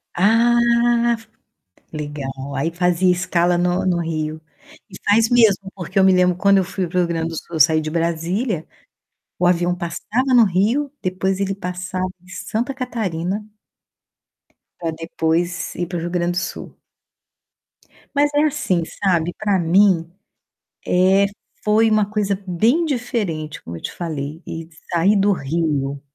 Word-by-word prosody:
Ah, 230 Hz, +5 st, +4 dB, 0.6 s
f 225 Hz, 0 st, -17 dB, 0.6 s
legal, 145 Hz, -3 st, -5 dB, 0.2 s
aí 165 Hz, +5 st, -1 dB
fazia 180 Hz, +1 st, +2 dB
escala 175 Hz, 0 st, +1 dB
no 180 Hz, +1 st, +1 dB
no 175 Hz, -2 st, +1 dB
Rio. 155 Hz, -1 st, -3 dB, 0.5 s
E -, -, -12 dB
faz 225 Hz, +2 st, +4 dB
mesmo, 210 Hz, -5 st, +3 dB
porque 185 Hz, +1 st, -2 dB
eu -, -, +5 dB
me 190 Hz, -1 st, +6 dB
lembro 180 Hz, -1 st, +3 dB
quando 200 Hz, 0 st, +4 dB
eu -, -, +1 dB
fui 190 Hz, -1 st, -3 dB
para 180 Hz, +2 st, -4 dB
o -, -, +5 dB
Rio 175 Hz, -, +2 dB
Grande 165 Hz, -1 st, -2 dB
do 165 Hz, -, -6 dB
Sul, 165 Hz, -, -7 dB
eu -, -, -2 dB
saí 155 Hz, +2 st, +5 dB
de 155 Hz, -, -4 dB
Brasília, 170 Hz, +4 st, -1 dB, 0.7 s
o 180 Hz, -, +2 dB
avião 175 Hz, 0 st, +2 dB
passava 220 Hz, +10 st, -2 dB
no 235 Hz, -2 st, +7 dB
Rio, 220 Hz, +10 st, +1 dB
depois 185 Hz, +1 st, -1 dB
ele 195 Hz, 0 st, -1 dB
passava 185 Hz, 0 st, -4 dB
em 180 Hz, -, -21 dB
Santa 230 Hz, +7 st, -3 dB
Catarina 210 Hz, -6 st, -3 dB, 1.3 s
pra 165 Hz, -2 st, -3 dB
depois 165 Hz, +2 st, -2 dB
ir 175 Hz, -1 st, -3 dB
para 175 Hz, -, -4 dB
o -, -, -2 dB
Rio 175 Hz, -, -3 dB
Grande 175 Hz, 0 st, 0 dB
do -, -, -4 dB
Sul. 190 Hz, -, -4 dB, 1.4 s
Mas 290 Hz, +1 st, +3 dB
é 295 Hz, -, +4 dB
assim, 230 Hz, -, 0 dB, 0.2 s
sabe, 175 Hz, -2 st, +2 dB
pra 205 Hz, -3 st, +1 dB
mim, 175 Hz, -1 st, +3 dB, 0.8 s
eh, 190 Hz, +2 st, +4 dB, 0.4 s
foi 220 Hz, +1 st, +4 dB
uma 215 Hz, -1 st, +2 dB
coisa 205 Hz, -2 st, -1 dB
bem 235 Hz, -, +2 dB
diferente, 210 Hz, -, -3 dB
como 85 Hz, -, -8 dB
eu -, -, -9 dB
te -, -, -5 dB
falei, 155 Hz, -1 st, -5 dB
e 165 Hz, 0 st, -6 dB, 0.2 s
sair 185 Hz, +4 st, +3 dB
do 200 Hz, +1 st, +3 dB
Rio, 140 Hz, -3 st, -2 dB
180 Hz, 160 wpm, -20 LUFS, 165-205 Hz, 1.4 s, no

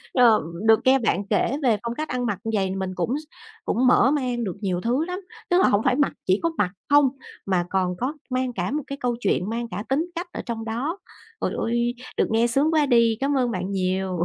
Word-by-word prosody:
Ờ, 235 Hz, -4 st, +6 dB, 0.3 s
được 220 Hz, 0 st, +6 dB
nghe 265 Hz, +1 st, +5 dB
bạn 205 Hz, -3 st, 0 dB
kể 270 Hz, +6 st, +1 dB
về 235 Hz, -5 st, +3 dB
phong 235 Hz, 0 st, -3 dB
cách 310 Hz, 0 st, -4 dB
ăn 250 Hz, -1 st, -1 dB
mặc 205 Hz, -5 st, -1 dB
như 225 Hz, -, -2 dB
vậy 195 Hz, -, +1 dB
thì 190 Hz, -, -3 dB
mình 190 Hz, -1 st, -2 dB
cũng 180 Hz, +4 st, -1 dB
s -, -, -11 dB, 0.4 s
cũng 255 Hz, +2 st, +2 dB
mở 260 Hz, +1 st, +5 dB
mang 250 Hz, -5 st, -1 dB
được 185 Hz, -5 st, -3 dB
nhiều 180 Hz, -3 st, -1 dB
thứ 255 Hz, +7 st, 0 dB
lắm, 360 Hz, +2 st, -4 dB, 0.3 s
tức 355 Hz, -, +4 dB
là -, -, +5 dB
hổng 205 Hz, +1 st, +3 dB
phải 255 Hz, -1 st, +3 dB
mặc 290 Hz, 0 st, +1 dB
chỉ 190 Hz, +2 st, +3 dB
có 335 Hz, -, +3 dB
mặc 180 Hz, -3 st, +1 dB, 0.2 s
không 290 Hz, -2 st, +6 dB, 0.4 s
mà 185 Hz, -3 st, +1 dB
còn 185 Hz, -2 st, 0 dB
có 255 Hz, +4 st, -2 dB, 0.2 s
mang 255 Hz, -1 st, -1 dB
cả 180 Hz, +1 st, -2 dB
một 300 Hz, -1 st, -2 dB
cái 275 Hz, -, -5 dB
câu 245 Hz, -1 st, 0 dB
chuyện, 200 Hz, -2 st, 0 dB
mang 235 Hz, +1 st, -3 dB
cả 200 Hz, +4 st, -4 dB
tính 310 Hz, +7 st, 0 dB
cách 345 Hz, +2 st, -4 dB
ở -, -, -4 dB
trong 225 Hz, -2 st, -4 dB
đó. 260 Hz, -, -3 dB, 0.4 s
Trời -, -, 0 dB
ơi, 240 Hz, +1 st, 0 dB, 0.2 s
được -, -, +2 dB
nghe 230 Hz, +2 st, +3 dB
sướng 285 Hz, +7 st, +2 dB
quá 305 Hz, -2 st, +4 dB
đi, 235 Hz, -3 st, +3 dB
cám 275 Hz, 0 st, +1 dB
ơn 245 Hz, -2 st, +1 dB
bạn 185 Hz, -1 st, -3 dB
nhiều! 185 Hz, -1 st, -1 dB
235 Hz, 250 wpm, -24 LUFS, 200-270 Hz, 0.4 s, Ờ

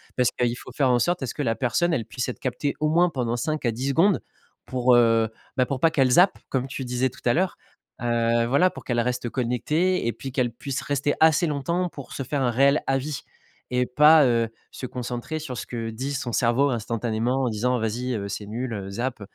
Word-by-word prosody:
Parce 125 Hz, -1 st, +3 dB
qu'il 120 Hz, -1 st, 0 dB
faut -, -, -11 dB
faire 130 Hz, +1 st, +1 dB
en 125 Hz, -1 st, +3 dB
sorte 175 Hz, +8 st, 0 dB
à -, -, -2 dB
ce -, -, -4 dB
que -, -, -4 dB
la 115 Hz, -3 st, +1 dB
personne, 140 Hz, +9 st, +1 dB
elle 115 Hz, -8 st, -1 dB
puisse 125 Hz, +3 st, -4 dB
être 125 Hz, -, -6 dB
captée, 135 Hz, +3 st, -2 dB
au 155 Hz, -, +1 dB
moins, 175 Hz, +3 st, +4 dB
pendant 125 Hz, -6 st, -2 dB
5 155 Hz, +3 st, -2 dB
à 120 Hz, -, +2 dB
10 125 Hz, +5 st, -3 dB
secondes 170 Hz, +8 st, +3 dB, 0.5 s
pour, 125 Hz, -1 st, +3 dB
heu, 115 Hz, -2 st, +4 dB, 0.3 s
bah, 130 Hz, -, +3 dB
pour 135 Hz, 0 st, -3 dB
pas 165 Hz, -, +4 dB
qu'elle 135 Hz, -5 st, +2 dB
zappe, 180 Hz, +8 st, +5 dB
comme 130 Hz, 0 st, -1 dB
tu 135 Hz, 0 st, -5 dB
disais 125 Hz, +1 st, 0 dB
tout -, -, -16 dB
à 120 Hz, -, +4 dB
l'heure, 185 Hz, +2 st, 0 dB, 0.4 s
heu, 115 Hz, -1 st, +1 dB
voilà 140 Hz, +9 st, +4 dB
pour -, -, -11 dB
qu'elle 120 Hz, -2 st, +1 dB
reste 125 Hz, 0 st, -2 dB
connectée 135 Hz, +8 st, 0 dB
et 120 Hz, -, 0 dB
puis 135 Hz, -, -7 dB
qu'elle 125 Hz, -2 st, 0 dB
puisse 130 Hz, +3 st, -4 dB
rester 145 Hz, 0 st, 0 dB
assez 160 Hz, +1 st, +5 dB
longtemps 170 Hz, +5 st, -1 dB
pour 140 Hz, -6 st, -10 dB
se 135 Hz, -, -4 dB
faire 140 Hz, +2 st, -2 dB
un 125 Hz, -2 st, +2 dB
réel 140 Hz, +4 st, +3 dB
avis 135 Hz, +2 st, -1 dB, 0.5 s
et 125 Hz, 0 st, +2 dB
pas, 150 Hz, +4 st, +6 dB
heu, 115 Hz, -2 st, +2 dB, 0.2 s
se -, -, -7 dB
concentrer 125 Hz, +5 st, -4 dB
sur 140 Hz, -5 st, -6 dB
ce -, -, -5 dB
que 115 Hz, -2 st, -4 dB
dit 130 Hz, +6 st, -4 dB
son 130 Hz, -3 st, -3 dB
cerveau 125 Hz, +5 st, +3 dB
instantanément 115 Hz, +2 st, -1 dB
en 125 Hz, -, +1 dB
disant: 125 Hz, +3 st, 0 dB
«Vas-y, 120 Hz, +3 st, -2 dB
heu, 100 Hz, -2 st, -4 dB
c'est 105 Hz, +1 st, -5 dB
nul, 120 Hz, +4 st, -4 dB
heu, 100 Hz, -2 st, -5 dB
zappe». 120 Hz, +3 st, -3 dB
125 Hz, 230 wpm, -24 LUFS, 120-140 Hz, 0.5 s, pas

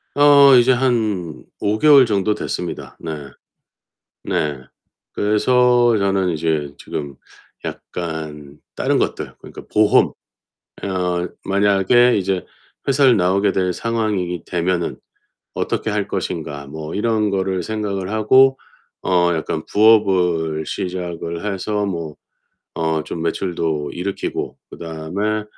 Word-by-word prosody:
어, 145 Hz, -1 st, +7 dB
이제 125 Hz, +2 st, +5 dB
한 110 Hz, -, -1 dB, 0.2 s
5 105 Hz, +1 st, 0 dB
개월 140 Hz, -2 st, +7 dB
정도 105 Hz, -1 st, 0 dB
됐습니다. 90 Hz, -4 st, -5 dB
네. 75 Hz, -4 st, -7 dB, 0.9 s
네. 75 Hz, -2 st, -1 dB, 0.5 s
그래서 120 Hz, +3 st, +3 dB
저는 95 Hz, -2 st, +1 dB
이제 75 Hz, -3 st, -1 dB
지금 70 Hz, -2 st, -6 dB, 0.5 s
약간 75 Hz, -4 st, -6 dB, 0.2 s
다른 -, -, +1 dB
것들 -, -, -2 dB
그러니까 -, -, -11 dB
보험. 105 Hz, -1 st, +4 dB, 0.7 s
어 90 Hz, -2 st, -1 dB, 0.2 s
만약에 100 Hz, +5 st, +3 dB
이제 95 Hz, -1 st, -1 dB, 0.4 s
회사를 135 Hz, -3 st, +5 dB
나오게 100 Hz, +2 st, +2 dB
될 90 Hz, -1 st, 0 dB
상황이게 105 Hz, -6 st, -2 dB
되면은 90 Hz, 0 st, -1 dB, 0.6 s
어떻게 -, -, -2 dB
할 -, -, -1 dB
것인가 70 Hz, -1 st, -4 dB
뭐 80 Hz, +2 st, -7 dB
이런 110 Hz, -1 st, +1 dB
거를 95 Hz, -1 st, -1 dB
생각을 100 Hz, -2 st, -3 dB
하고 130 Hz, +5 st, +4 dB, 0.4 s
어 90 Hz, -2 st, +2 dB
약간 80 Hz, 0 st, -3 dB
부업을 90 Hz, -8 st, +3 dB
시작을 85 Hz, -1 st, -4 dB
해서 105 Hz, +2 st, -2 dB
뭐 85 Hz, -5 st, -4 dB, 0.6 s
어 80 Hz, -1 st, -1 dB
좀 85 Hz, -, -6 dB
매출도 85 Hz, -4 st, -2 dB
일으키고 95 Hz, +2 st, -4 dB
그다음에 90 Hz, +7 st, -3 dB
95 Hz, 230 characters per minute, -20 LUFS, 85-110 Hz, 0.9 s, 어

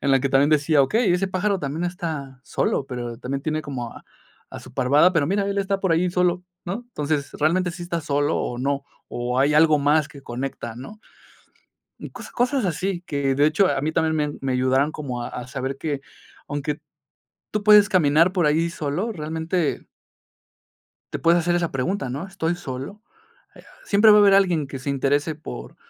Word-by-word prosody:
en 140 Hz, -, 0 dB
la 135 Hz, -, +4 dB
que 140 Hz, -, 0 dB
también 135 Hz, +2 st, +3 dB
decía: 150 Hz, -1 st, +4 dB
"Okey, 195 Hz, -, +2 dB
ese 190 Hz, +2 st, 0 dB
pájaro 195 Hz, +2 st, 0 dB
también 150 Hz, +2 st, -3 dB
está 160 Hz, -7 st, -5 dB
solo, -, -, -1 dB
pero 120 Hz, -2 st, -5 dB
también 135 Hz, +2 st, -4 dB
tiene 155 Hz, 0 st, -2 dB
como 125 Hz, -4 st, -5 dB
a -, -, -13 dB, 0.5 s
a -, -, -6 dB
su -, -, -14 dB
parvada, 145 Hz, +8 st, +4 dB
pero 150 Hz, -4 st, +1 dB
mira, 200 Hz, +2 st, 0 dB
él 200 Hz, -, -1 dB
está 195 Hz, 0 st, 0 dB
por 190 Hz, -3 st, +1 dB
ahí 175 Hz, +2 st, +2 dB
solo", 180 Hz, 0 st, +1 dB, 0.2 s
¿no? 195 Hz, +7 st, -4 dB
Entonces, 150 Hz, -, -2 dB
realmente, 175 Hz, +4 st, +1 dB
¿sí 175 Hz, +1 st, -8 dB
está 170 Hz, -1 st, -3 dB
solo 145 Hz, -2 st, 0 dB
o 120 Hz, -, -3 dB
no, 140 Hz, +2 st, -1 dB, 0.3 s
o 125 Hz, +1 st, -2 dB
hay 140 Hz, +3 st, +3 dB
algo 155 Hz, 0 st, +5 dB
más 145 Hz, +2 st, +2 dB
que 140 Hz, -, -13 dB
conecta, 120 Hz, -2 st, -5 dB
no? 135 Hz, -, -10 dB, 1.0 s
Mm, -, -, -7 dB
cos -, -, -10 dB
cosas 250 Hz, 0 st, 0 dB
así 180 Hz, +1 st, -2 dB
que, 140 Hz, -5 st, -1 dB
de 145 Hz, -, +4 dB
hecho, 165 Hz, +6 st, +3 dB
a 135 Hz, -, 0 dB
mí 155 Hz, +2 st, -1 dB
también 160 Hz, 0 st, +1 dB
me 150 Hz, -, +1 dB
a 145 Hz, -, -4 dB
me 135 Hz, -, -1 dB
ayudaron 130 Hz, +3 st, +2 dB
como 125 Hz, -6 st, -5 dB
a -, -, -5 dB
a 125 Hz, -1 st, -7 dB
saber 135 Hz, +1 st, -4 dB
que 145 Hz, -2 st, -3 dB, 0.5 s
aunque 145 Hz, +1 st, -3 dB, 0.7 s
tú 210 Hz, -1 st, -2 dB
puedes 210 Hz, -1 st, +7 dB
caminar 165 Hz, -2 st, +4 dB
por 180 Hz, -3 st, +1 dB
ahí 160 Hz, +3 st, +2 dB
solo, 170 Hz, +7 st, -3 dB
realmente 160 Hz, 0 st, -2 dB, 1.3 s
te -, -, -3 dB
puedes 170 Hz, +1 st, +4 dB
hacer 175 Hz, +1 st, +1 dB
esa 175 Hz, -1 st, 0 dB
pregunta, 135 Hz, +3 st, -2 dB
¿no?: 140 Hz, +9 st, -5 dB
"¿Estoy 175 Hz, -3 st, -2 dB
solo?". 140 Hz, +6 st, -7 dB, 0.5 s
Eh, -, -, -16 dB, 0.2 s
siempre 210 Hz, +2 st, +5 dB
va 210 Hz, -, +8 dB
a -, -, +7 dB
haber 200 Hz, -1 st, +6 dB
alguien 180 Hz, -7 st, +3 dB
que 135 Hz, 0 st, -7 dB
se 130 Hz, +2 st, -4 dB
interese 145 Hz, +3 st, 0 dB
por 60 Hz, -, -9 dB
155 Hz, 200 wpm, -23 LUFS, 140-180 Hz, 1.3 s, va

